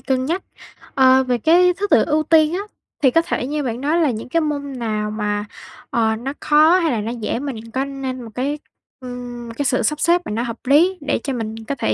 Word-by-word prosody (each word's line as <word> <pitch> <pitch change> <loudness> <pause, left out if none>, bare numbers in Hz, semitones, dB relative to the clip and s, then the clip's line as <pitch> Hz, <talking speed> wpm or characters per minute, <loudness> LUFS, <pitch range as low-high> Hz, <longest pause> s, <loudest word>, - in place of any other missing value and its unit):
cân 260 -1 -1
nhắc, 345 +6 -2 0.5
à, 260 0 +5
về 250 -1 0
cái 355 +7 +4
thứ 410 +1 -1
tự - - +5
ưu 310 0 +2
tiên 315 +1 +4
á. 370 - -1 0.4
Thì 265 -3 +5
có 330 - +4
thể 255 -6 -3
như 295 0 -2
bạn 240 -1 -3
nói 320 +4 +1
là 290 -5 +3
những 225 +2 -6
cái 330 +3 +1
môn 285 -4 -3
nào 215 -2 -2
mà, 210 -1 -2 0.4
ờ, 220 -1 +1
nó 265 +5 -5
khó 310 +4 +5
hay 330 -4 +1
là 220 -3 -1
nó 225 +3 -3
dễ 230 0 -3
mình 230 -5 -6
có 265 +3 -1
nên 265 -2 -5
một 225 - -9
cái, 285 +4 -2 0.4
ừm, 245 -2 -7
cái 285 - -1
sự 250 -2 +1
sắp 300 +5 0
xếp 345 +2 +3
mà - - -5
nó 230 +3 -1
hợp 235 -1 -4
lý, 345 +7 +4
để 290 - -1
cho 275 - -2
mình 225 -2 -4
có 280 - -3
thể - - 0
265 Hz, 240 wpm, -20 LUFS, 235-305 Hz, 0.5 s, à